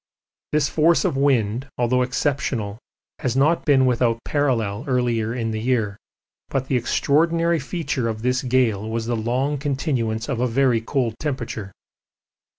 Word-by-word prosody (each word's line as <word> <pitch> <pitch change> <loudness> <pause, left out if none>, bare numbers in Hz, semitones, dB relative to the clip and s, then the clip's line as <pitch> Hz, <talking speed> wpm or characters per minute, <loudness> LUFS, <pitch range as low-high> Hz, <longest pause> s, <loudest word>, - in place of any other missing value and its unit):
This 150 -2 +2
force 160 +3 +3
of - - +1
wind, 130 -3 +1
although 125 +1 +2
exceptional, 125 -5 -1 0.4
has 125 0 -1
not 155 +5 +2
been 135 -3 +4
without 120 -2 +2
parallel 120 -8 0
earlier 120 -4 0
in 115 -2 -2
the 110 - -2
year, 110 -5 0 0.5
but 135 -1 -1
the 135 - 0
extraordinary 165 +7 +2
feature 150 -9 -2
of 110 0 -5
this 125 +1 +1
gale 120 -5 +1
was 115 0 -2
the 120 +1 -1
long 130 +6 -1
continuance 130 -6 -1
of 130 -4 -2
a 125 - +2
very 125 -1 +2
cold 120 -1 -1
temperature. 120 -8 -4
125 Hz, 150 wpm, -22 LUFS, 115-140 Hz, 0.5 s, been